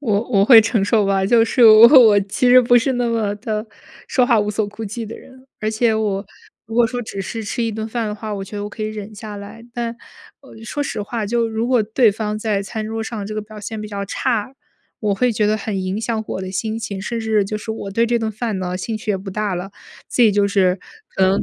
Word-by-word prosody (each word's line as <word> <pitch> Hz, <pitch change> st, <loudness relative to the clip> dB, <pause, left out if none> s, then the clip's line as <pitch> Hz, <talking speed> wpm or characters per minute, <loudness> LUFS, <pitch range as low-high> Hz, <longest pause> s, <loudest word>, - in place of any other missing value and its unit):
我 215 Hz, -7 st, +1 dB
我 200 Hz, -3 st, +4 dB
会 230 Hz, -1 st, +9 dB
承 220 Hz, -2 st, +1 dB
受 210 Hz, -1 st, +2 dB
吧， 195 Hz, -1 st, +1 dB
就 230 Hz, +2 st, +4 dB
是 235 Hz, +1 st, +3 dB
我 220 Hz, +1 st, +10 dB, 0.2 s
我 205 Hz, -2 st, +5 dB
其 205 Hz, +5 st, 0 dB
实 255 Hz, +1 st, +8 dB
不 245 Hz, 0 st, +4 dB
是 260 Hz, +3 st, 0 dB
那 245 Hz, -1 st, 0 dB
么 220 Hz, -3 st, -1 dB
的 215 Hz, 0 st, -4 dB, 0.4 s
说 250 Hz, -2 st, +2 dB
话 235 Hz, -2 st, +4 dB
无 205 Hz, -, -1 dB
所 210 Hz, 0 st, -1 dB
顾 220 Hz, +2 st, -8 dB
忌 220 Hz, +2 st, -5 dB
的 225 Hz, -, -8 dB
人， 260 Hz, 0 st, -16 dB
而 215 Hz, 0 st, -1 dB
且 225 Hz, 0 st, +1 dB
我 205 Hz, -2 st, -1 dB, 0.4 s
如 225 Hz, -, -8 dB
果 240 Hz, -1 st, +4 dB
说 245 Hz, +1 st, -4 dB
只 195 Hz, -3 st, -6 dB
是 225 Hz, +3 st, -5 dB
吃 235 Hz, +3 st, -3 dB
一 225 Hz, -1 st, -1 dB
顿 220 Hz, +1 st, -4 dB
饭 230 Hz, -1 st, -2 dB
的 210 Hz, -, -4 dB
话， 215 Hz, -1 st, -5 dB
我 195 Hz, -1 st, -5 dB
觉 205 Hz, -, -9 dB
得 205 Hz, -, -4 dB
我 -, -, -4 dB
可 215 Hz, -, -7 dB
以 -, -, -1 dB
忍 215 Hz, 0 st, -7 dB
下 210 Hz, 0 st, -8 dB
来， 210 Hz, +3 st, -10 dB
但， 235 Hz, -1 st, -4 dB, 0.4 s
呃， 270 Hz, -5 st, -15 dB
说 290 Hz, +4 st, -3 dB
实 225 Hz, -6 st, -4 dB
话， 220 Hz, +1 st, -4 dB
就 230 Hz, +1 st, 0 dB
如 225 Hz, +1 st, -2 dB
果 245 Hz, -3 st, +3 dB
对 220 Hz, 0 st, +3 dB
方 210 Hz, 0 st, -3 dB
在 210 Hz, -2 st, -1 dB
餐 215 Hz, +2 st, -5 dB
桌 225 Hz, 0 st, -4 dB
上 220 Hz, -3 st, -5 dB
这 215 Hz, -, -6 dB
个 215 Hz, -, -2 dB
表 215 Hz, 0 st, -12 dB
现 220 Hz, +1 st, -6 dB
比 215 Hz, -, -6 dB
较 200 Hz, -1 st, -4 dB
差， 240 Hz, +4 st, -2 dB, 0.5 s
我 205 Hz, -2 st, 0 dB
会 245 Hz, +3 st, +1 dB
觉 210 Hz, -1 st, +1 dB
得 215 Hz, +1 st, +2 dB
很 200 Hz, -3 st, -3 dB
影 185 Hz, +3 st, -2 dB
响 225 Hz, -1 st, -2 dB
我 -, -, -3 dB
的 185 Hz, -, -5 dB
心 215 Hz, +4 st, -3 dB
情， 205 Hz, -4 st, -5 dB
甚 230 Hz, +4 st, -4 dB
至 220 Hz, -2 st, +1 dB
就 210 Hz, +2 st, -4 dB
是 220 Hz, -, -6 dB
我 200 Hz, -3 st, -5 dB
对 230 Hz, +4 st, +2 dB
这 235 Hz, 0 st, +1 dB
顿 220 Hz, -1 st, -2 dB
饭 220 Hz, -2 st, -3 dB
呢， 180 Hz, -1 st, -3 dB
兴 215 Hz, +4 st, -4 dB
趣 215 Hz, -1 st, -4 dB
也 195 Hz, -, +1 dB
不 195 Hz, +1 st, -8 dB
大 210 Hz, -1 st, -2 dB
了， 180 Hz, +3 st, -5 dB, 0.4 s
自 245 Hz, -, +2 dB
己 220 Hz, -, +6 dB
就 205 Hz, 0 st, +2 dB
是 190 Hz, -2 st, +2 dB, 0.4 s
可 190 Hz, -, +2 dB
能 190 Hz, +1 st, +2 dB
215 Hz, 285 characters per minute, -20 LUFS, 205-230 Hz, 0.5 s, 我